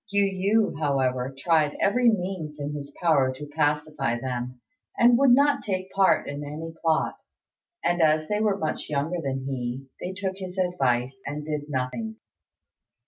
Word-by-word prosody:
Yu 200 Hz, 0 st, +3 dB, 0.5 s
yü, 145 Hz, -, -9 dB
however, 130 Hz, -3 st, 0 dB
tried 155 Hz, -1 st, +2 dB
every 240 Hz, +4 st, +4 dB
means 180 Hz, -7 st, -2 dB
in 145 Hz, +1 st, -3 dB
his 140 Hz, -1 st, -6 dB
power 140 Hz, -6 st, +4 dB
to 130 Hz, +3 st, -8 dB
pacify 145 Hz, -4 st, 0 dB
them, 125 Hz, 0 st, -4 dB, 0.4 s
and 240 Hz, 0 st, +6 dB
would 275 Hz, -1 st, +5 dB
not 280 Hz, +4 st, +4 dB
take 190 Hz, -2 st, -3 dB
part 195 Hz, -1 st, +3 dB
in 145 Hz, +1 st, -5 dB
any 155 Hz, +3 st, -6 dB
plot; 160 Hz, -1 st, +1 dB, 0.7 s
and, 175 Hz, 0 st, +2 dB
as 155 Hz, 0 st, +3 dB
they 210 Hz, 0 st, 0 dB
were 210 Hz, -2 st, +2 dB
much 155 Hz, -5 st, -3 dB
younger 155 Hz, +4 st, -1 dB
than 135 Hz, -2 st, -3 dB
he, 130 Hz, 0 st, -3 dB
they 180 Hz, -, -4 dB
took 190 Hz, 0 st, -3 dB
his 185 Hz, -1 st, -7 dB
advice, 130 Hz, -8 st, 0 dB
and 150 Hz, +1 st, -4 dB
did 150 Hz, -1 st, -4 dB
nothing. 145 Hz, -, -3 dB
150 Hz, 160 wpm, -26 LUFS, 135-185 Hz, 0.7 s, and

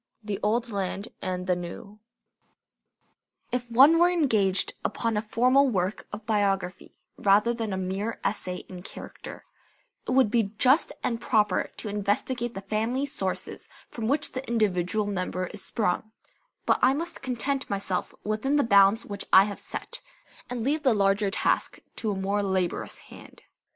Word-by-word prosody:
The 205 Hz, -2 st, -3 dB
Old 230 Hz, +3 st, 0 dB
Land 195 Hz, 0 st, -3 dB
and 180 Hz, -1 st, -3 dB
the 180 Hz, -1 st, +2 dB
New 180 Hz, +4 st, -8 dB, 1.5 s
If 245 Hz, -1 st, -2 dB
one 275 Hz, +8 st, +7 dB
were 350 Hz, +1 st, +6 dB
engaged 220 Hz, -, +3 dB
upon 230 Hz, +1 st, -1 dB
a 210 Hz, -, +1 dB
formal 255 Hz, +5 st, +3 dB
work 190 Hz, -2 st, -2 dB
of 210 Hz, +1 st, -7 dB
biography 195 Hz, -4 st, -1 dB, 0.2 s
rather 210 Hz, +4 st, +4 dB
than 225 Hz, -3 st, -3 dB
a 190 Hz, -, -2 dB
mere 190 Hz, +4 st, -3 dB
essay 185 Hz, -3 st, -2 dB
in 180 Hz, -1 st, -9 dB
character, -, -, -10 dB, 0.6 s
it -, -, -4 dB
would 255 Hz, -5 st, +4 dB
be 220 Hz, -3 st, +1 dB
just 260 Hz, +7 st, +4 dB
and 230 Hz, -2 st, -1 dB
proper 210 Hz, -1 st, +1 dB
to -, -, -5 dB
investigate 210 Hz, +4 st, -1 dB
the 195 Hz, -, -5 dB
family 225 Hz, +7 st, -1 dB
sources 200 Hz, -10 st, -4 dB, 0.2 s
from 225 Hz, -2 st, -4 dB
which 285 Hz, +4 st, +1 dB
the 260 Hz, +1 st, -6 dB
individual 210 Hz, -2 st, +1 dB
member 185 Hz, -2 st, -2 dB
is 205 Hz, -, -7 dB
sprung; 215 Hz, -1 st, -1 dB, 0.5 s
but -, -, +3 dB
I 260 Hz, +2 st, +5 dB
must 335 Hz, +3 st, -4 dB
content 265 Hz, +2 st, -2 dB
myself 195 Hz, -2 st, -2 dB
within 215 Hz, +7 st, 0 dB
the 290 Hz, -, +4 dB
bounds 200 Hz, 0 st, +5 dB
which 200 Hz, -1 st, -6 dB
I 190 Hz, -, +9 dB
have 205 Hz, 0 st, -5 dB
set, -, -, -5 dB, 0.5 s
and 245 Hz, -2 st, -3 dB
leave 295 Hz, +5 st, 0 dB
the 255 Hz, -6 st, +3 dB
larger 200 Hz, 0 st, +2 dB
task -, -, 0 dB, 0.2 s
to 220 Hz, -, -2 dB
a 205 Hz, -, -1 dB
more 195 Hz, +2 st, 0 dB
laborious 190 Hz, -3 st, -1 dB
hand. -, -, -15 dB
210 Hz, 160 wpm, -27 LUFS, 195-240 Hz, 1.5 s, I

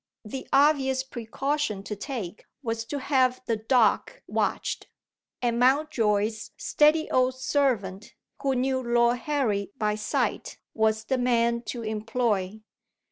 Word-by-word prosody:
The 260 Hz, +5 st, -6 dB
obvious 270 Hz, -2 st, +3 dB
precaution 265 Hz, -2 st, -3 dB
to 210 Hz, -, -5 dB
take 210 Hz, -, -6 dB, 0.2 s
was 225 Hz, -1 st, -2 dB
to 290 Hz, -, -4 dB
have 260 Hz, -2 st, +2 dB
the 230 Hz, -, 0 dB
Dock 230 Hz, -, +1 dB
watched; -, -, -2 dB, 0.6 s
and 235 Hz, -1 st, +1 dB
Mountjoy's 230 Hz, -6 st, +2 dB
steady 305 Hz, +1 st, +3 dB
old 255 Hz, 0 st, +2 dB
servant, 255 Hz, -8 st, -1 dB, 0.3 s
who 270 Hz, -2 st, +1 dB
knew 260 Hz, +1 st, 0 dB
Lord 240 Hz, 0 st, +2 dB
Harry 230 Hz, -8 st, -1 dB
by 210 Hz, -2 st, +1 dB
sight, 210 Hz, 0 st, -2 dB, 0.2 s
was 220 Hz, 0 st, +1 dB
the 255 Hz, +3 st, -1 dB
man 235 Hz, -1 st, +2 dB
to 240 Hz, -2 st, -4 dB
employ. 215 Hz, -2 st, -1 dB
240 Hz, 125 wpm, -26 LUFS, 220-265 Hz, 0.6 s, obvious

